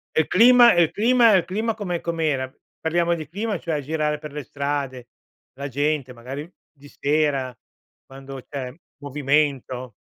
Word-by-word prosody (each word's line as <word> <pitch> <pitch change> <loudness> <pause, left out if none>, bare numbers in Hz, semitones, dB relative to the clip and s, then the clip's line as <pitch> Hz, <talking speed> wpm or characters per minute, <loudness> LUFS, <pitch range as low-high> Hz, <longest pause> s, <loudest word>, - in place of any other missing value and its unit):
E - - +5
il 155 - -5
clima 240 +3 +7
e 175 - +6
il 160 - 0
clima 235 +1 +4
e - - +7
il 180 - 0
clima 220 +4 -1
com'è 190 -5 -3
com'era? 155 -6 -1 0.3
Parliamo 170 +1 +1
di 155 -3 -7
clima, 205 +5 -3
cioè, 160 -3 -3
girare 150 +1 -1
per 150 -1 -8
le 150 0 -6
strade, 140 -2 -4 0.5
la 140 +2 -6
gente, 145 -1 -1
magari, 130 +6 -7 0.2
di 145 -1 -17
sera, 145 -3 0 0.5
quando 135 -1 -10
c'è 130 -3 -5 0.3
movimento. 140 -3 -1
150 Hz, 160 wpm, -23 LUFS, 135-170 Hz, 0.5 s, clima